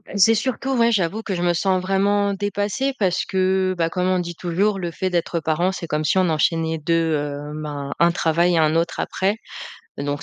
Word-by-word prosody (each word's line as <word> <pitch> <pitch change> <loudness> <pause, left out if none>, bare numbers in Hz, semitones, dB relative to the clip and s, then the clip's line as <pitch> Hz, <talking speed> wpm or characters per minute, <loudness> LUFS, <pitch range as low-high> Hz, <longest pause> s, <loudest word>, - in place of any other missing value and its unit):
C'est 225 +3 +5
surtout, 260 +3 -2
ouais, 235 0 +3
j'avoue 200 +1 0
que 195 -4 -3
je 175 - -3
me 175 0 +2
sens 185 +1 +1
vraiment 200 +1 +1
dépassée 205 +6 -1
parce 180 -3 +1
que 185 0 +1
bah, 165 -1 +1
comme 180 +1 -1
on 185 -1 +2
dit, 175 -1 -4
toujours 195 +4 0
«Le 175 -1 -3
fait 185 +3 -3
d'être 170 -1 -1
parent, 160 +4 0
c'est 175 -3 -6
comme 150 +1 -1
si 190 - +2
on 185 -1 +3
enchaînait 160 +1 +1
2, 165 +1 +1
heu, 145 0 -4
ben, 145 -2 -5
1 170 0 +5
travail 170 +2 +2
et - - +2
1 155 0 +3
autre 165 0 0
après,» 195 +3 0 0.6
donc 145 0 -3
180 Hz, 210 wpm, -22 LUFS, 165-195 Hz, 0.6 s, C'est